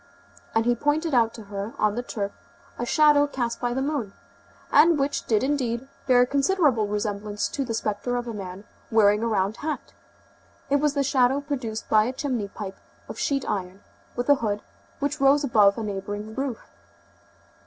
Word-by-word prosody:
And 225 0 +3
he 240 - +4
pointed 295 +5 0
out 230 -2 +4
to 225 - -9
her 200 +2 -6
on 215 -1 +2
the 240 - -2
turf 205 -4 -4 0.5
a 240 - -2
shadow 295 +1 +5
cast 240 -4 -3
by 245 0 -1
the 265 - 0
moon, 275 -9 -2 0.6
and 315 +3 +6
which 280 0 -1
did 220 0 +2
indeed, 260 -3 -1 0.2
bear 250 -1 +6
considerable 275 - +2
resemblance 205 0 -2
to 275 - -2
the 230 -3 -3
spectre 215 +3 -2
of 245 0 -3
a 230 - -4
man 190 -1 -7 0.3
wearing 210 -1 +4
a 230 - 0
round 205 -1 0
hat. 305 0 -5 0.8
It 285 - +5
was 295 0 +1
the 280 - +2
shadow 265 -1 +3
produced 260 -7 -4
by 215 0 +4
a 250 - -2
chimney 255 -7 -2
pipe 195 -1 -7 0.3
of - - -8
sheet 275 -2 0
iron, 190 -1 -3 0.3
with 245 0 -2
a 285 - +7
hood, 210 -2 -1 0.3
which 285 +1 -2
rose 280 +2 +5
above 210 -7 +4
a 225 - -3
neighboring 205 +1 -5
roof. 265 -2 -4
240 Hz, 180 wpm, -25 LUFS, 210-280 Hz, 0.8 s, a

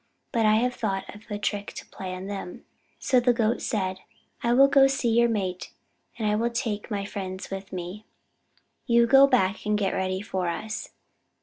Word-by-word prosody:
But 230 -4 +2
I 215 - +5
have 250 +3 +1
thought 195 -5 -2
of 210 +2 -15
a 205 - -3
trick 205 0 -3
to - - -8
play 185 -1 -7
on 185 +1 -7
them." 195 -3 -7 0.3
So 255 - +3
the 245 0 +3
Goat 230 0 0
said: 190 -3 -2 0.4
"I 235 - +1
will 270 +3 +7
go 275 -1 +6
to - - -2
see 270 -3 0
your 235 +1 +4
mate, 190 -5 -3 0.4
and 220 -2 -1
I 210 - +2
will 230 +2 +1
take 230 -3 -3
my 200 -2 -2
friends 190 -2 -6
with 195 0 -6
me. 185 +4 -7 0.8
You 235 -1 +5
go 270 +3 +7
back 205 -7 +1
and 210 0 +1
get 195 -2 0
ready 185 0 -1
for 190 -4 -3
us. 215 +6 -4
210 Hz, 200 wpm, -26 LUFS, 190-235 Hz, 0.8 s, will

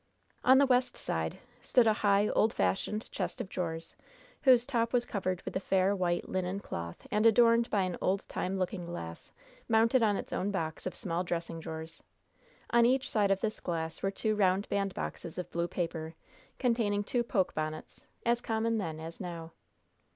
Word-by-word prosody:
On 260 +1 +7
the 280 - +6
west 250 -1 +2
side 80 0 -2 0.2
stood 245 - +4
a 220 - +5
high, 205 0 +4
old 220 - +2
fashioned 95 - -1
chest - - -3
of - - -3
drawers, 165 -3 -4 0.5
whose 250 -4 +6
top 235 -3 0
was 245 -1 +2
covered 185 -5 -2
with - - -6
a - - +2
fair, 190 +1 +2
white, 175 -2 0
linen 185 +1 -2
cloth, 85 - -6
and 210 +1 +2
adorned 230 +1 +5
by 200 -3 +2
an 180 -2 -3
old 190 +2 0
time 190 +1 -2
looking 180 -1 -2
glass 85 - -7 0.4
mounted 230 +3 +4
on 210 -2 +3
its - - -6
own 195 - 0
box 165 -4 -3
of 185 - -5
small 180 -4 -2
dressing 170 -1 -3
drawers. 160 0 -7 0.7
On 235 0 +5
each 255 +2 +2
side 205 -3 +2
of 195 -1 +2
this 215 -1 -2
glass 165 -2 -3
were 195 - +1
two 215 +2 -1
round 195 0 +2
bandboxes 195 -4 -3
of 180 - -5
blue 170 0 -1
paper, 165 -2 -4 0.4
containing 225 -5 +1
two 240 +3 0
poke 205 -6 0
bonnets, 155 0 -5 0.2
as 235 0 +2
common 225 0 0
then 160 -5 -4
as 165 +1 -8
now. 170 -2 -6
195 Hz, 180 wpm, -31 LUFS, 170-225 Hz, 0.7 s, On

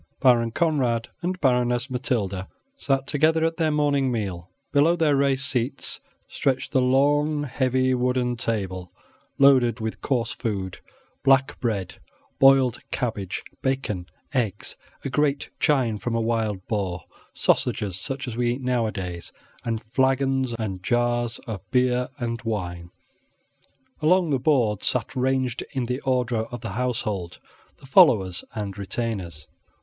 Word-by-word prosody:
Baron 120 -3 +4
Conrad 125 -5 0
and 185 +1 -2
Baroness 125 -2 +2
Matilda 105 -7 -2 0.3
sat 135 - 0
together 160 +3 +2
at 165 0 -1
their 160 -2 +2
morning 145 -3 +2
meal 95 -6 -3 0.2
below 150 +4 +4
their 160 -4 +3
raised 135 -1 +2
seats 130 0 -1 0.3
stretched 130 0 -1
the 130 - +3
long, 145 +3 +2
heavy 130 -1 +1
wooden 125 0 +1
table, 95 -6 -3 0.5
loaded 130 -5 +5
with 110 0 -4
coarse 120 -4 0
food 100 -7 -4 0.4
black 135 0 +3
bread, 105 -6 -2 0.4
boiled 135 -3 +5
cabbage, 105 -6 -3 0.2
bacon, 130 -9 -2 0.3
eggs, 110 -6 -2 0.3
a - - -1
great 145 -1 0
chine 125 -8 +2
from 115 +4 -2
a - - +2
wild 110 -4 -1
boar, 95 -5 -2 0.3
sausages, 95 -3 +1
such 135 +5 -4
as 120 - -4
we 120 0 +1
eat 130 - -6
nowadays, 105 -9 -2 0.3
and 115 -2 -2
flagons 135 -1 +2
and 100 -5 -4
jars 120 +1 0
of 110 -6 -5
beer 125 -1 +2
and 115 -3 -3
wine, 90 -6 -4 1.1
Along 170 +1 +3
the 135 - +2
board 120 -7 +2
sat 125 - -1
ranged 130 -1 0
in 130 -3 -1
the 125 +2 -2
order 125 -4 0
of 120 0 -8
the 115 - -5
household 110 -6 -2 0.4
the - - -16
followers 110 - +5
and 100 -3 -4
retainers. 95 -7 -4
125 Hz, 135 wpm, -24 LUFS, 110-135 Hz, 1.1 s, loaded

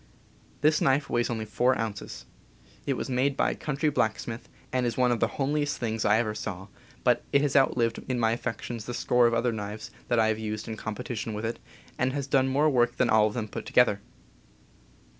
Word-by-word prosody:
This 155 +1 +3
knife 140 +3 +2
weighs 120 0 +1
only 110 -2 -2
4 125 +4 +2
ounces. 110 -3 -5 0.6
It - - +1
was - - -3
made 130 +2 0
by - - +2
a - - -4
coun 150 -2 -4
try 150 0 +2
blacksmith, 115 -2 -2 0.2
and 125 -1 +1
is 115 - -3
one 125 -1 +3
of 120 - 0
the - - +3
homeliest 145 +1 0
things 110 -2 -2
I 105 +1 +5
ever 110 -2 0
saw; 95 -2 -6 0.3
but 125 -2 +3
it 140 - +4
has 145 - 0
outlived 120 -4 +3
in 125 -1 -1
my 110 -1 +3
affections 115 0 -4
the 120 - -4
score 125 0 +3
of 115 - +1
other 120 +1 +1
knives 105 -1 -6 0.2
that 120 - +1
I 110 -1 +4
have 110 0 0
used 110 0 -4
in 110 - -4
competition 110 0 -5
with 105 +2 -4
it, 115 - -3 0.4
and 130 +1 +1
has 140 -1 -2
done 135 -1 +2
more 140 +3 +2
work 120 -4 +2
than 125 - +2
all 110 -1 +5
of 105 - -5
them 110 -3 -2
put 105 - -7
to - - -9
gether. 110 -5 +4
120 Hz, 220 wpm, -27 LUFS, 110-130 Hz, 0.6 s, I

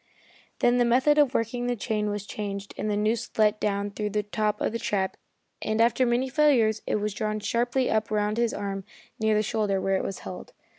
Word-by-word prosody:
Then 245 +1 +4
the - - +5
method 260 +5 +4
of 280 -3 +3
working 240 +2 -1
the 245 - 0
chain 210 -1 -1
was 205 -1 -3
changed 200 -1 -5
and 215 - -3
the 205 - 0
noose 215 +2 0
let 215 -1 +3
down 200 0 -1
through 210 +1 -3
the 210 0 -1
top 210 0 -1
of - - 0
the 230 - -3
trap, 190 -3 -1 0.5
and 220 +1 -1
after 235 +2 +3
many 240 +2 +1
failures 250 -6 +3
it - - +1
was 210 -1 -1
drawn 215 -1 -2
sharply 240 +4 0
up 220 0 0
round 210 0 0
his 235 -1 +2
arm 195 -1 -4 0.4
near 220 -1 +2
the 215 - +2
shoulder, 210 -3 0
where 195 0 0
it 195 - -4
held. 95 -1 -9
215 Hz, 210 wpm, -26 LUFS, 205-235 Hz, 0.5 s, the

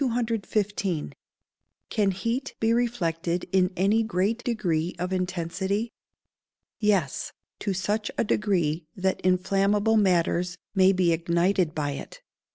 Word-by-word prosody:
Can 210 -3 +2
heat 230 +8 -2
be 225 +1 +2
reflected 175 -8 -1
in 185 -1 +3
any 200 +5 +3
great 220 +2 0
degree 180 -8 -1
of 180 +2 -2
intensity? 185 +4 -2 0.9
Yes; 200 -10 0 0.3
to 200 - -2
such 205 +3 -1
a - - +2
degree 175 -8 0
that 190 0 -1
inflammable 195 +4 +2
matters 180 -2 +2 0.2
may 190 -1 +5
be 185 -3 +2
ignited 170 +1 +1
by 145 -2 -1
it. 140 - -8
190 Hz, 110 wpm, -26 LUFS, 175-210 Hz, 0.9 s, may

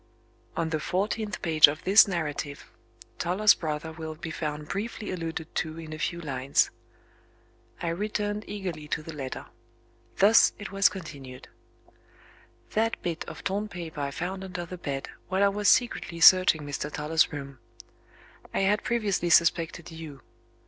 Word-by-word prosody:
On 165 -1 -1
the 155 - 0
fourteenth 205 +4 -2
page 155 -3 +7
of 150 +1 -4
this 200 +3 +7
narrative 150 -5 -3 0.5
Toller's 200 +4 +4
brother 155 0 -4
will 160 -1 -7
be 160 +1 -7
found 150 -1 -4
briefly 210 +2 -4
alluded 165 -3 -5
to 160 0 -3
in 160 -1 -8
a 155 - -7
few 170 +2 -2
lines. 140 -4 +1 1.1
I 170 - 0
returned 205 +3 -2
eagerly 180 -7 -5
to 155 - -2
the 165 - -8
letter. 135 -3 -6 0.7
Thus 210 +3 +6
it 205 -2 -7
was 195 0 +4
continued: 140 -8 -9 1.2
"That 225 +1 0
bit 170 -1 -3
of - - -9
torn 200 +2 -1
paper 170 -6 -7
I 140 - -1
found 185 +6 -4
under 185 -2 -5
the 180 +1 -8
bed, 140 -4 -4 0.2
while 190 +1 +1
I 200 - +5
was 205 0 +1
secretly 205 -8 +1
searching 185 -2 +7
Mr. 145 +1 -4
Toller's 155 +2 +1
room. 140 -3 -7 1.0
I - - +2
had 205 +2 +2
previously 210 -7 0
suspected 170 0 +2
You. 155 -5 -9
170 Hz, 150 wpm, -27 LUFS, 155-195 Hz, 1.2 s, page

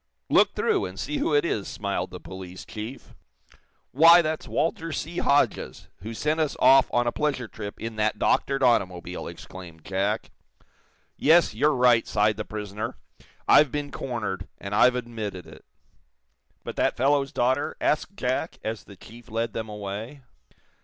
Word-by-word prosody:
"Look - - +4
through, - - +1
and 95 +1 -8
see 150 - -2
who 150 - +1
it 145 - +3
is," 105 - -2
smiled - - -3
the - - -9
police 95 -1 -9
chief. 110 +5 -8 0.8
"Why, 170 +4 +7
that's 155 0 -3
Walter 165 +2 -1
C. 170 +4 -4
Hodges, 140 +1 +1
who 110 +6 -8
sent 155 +6 0
us 155 -2 0
off 130 +1 +6
on 120 0 +2
a 120 - +1
pleasure 140 -5 -1
trip 105 -1 -8
in 115 -1 -6
that 110 0 +1
doctored 135 -1 +1
automobile!" 90 -7 0
exclaimed 85 -4 -11
Jack. 100 +3 -1 0.9
"Yes; 160 -3 +4
you're 145 +7 +2
right," 125 -2 +4
sighed 105 0 +2
the 105 - -3
prisoner. 105 0 -5 0.5
"I've 150 -4 +6
been 145 0 -3
cornered, 105 -7 -4
and 100 +1 -7
I've 125 +4 +5
admitted 110 -6 -5
it." - - -14 1.0
"But - - -7
that - - +1
fellow's 140 +1 +2
daughter?" 130 +4 0
asked 165 +6 0
Jack, 130 +6 -2
as 110 0 -4
the 100 - -13
chief 120 +6 -14
led 115 0 -2
them 110 -1 -4
away. 105 +6 -6
120 Hz, 160 wpm, -25 LUFS, 105-145 Hz, 1.0 s, Why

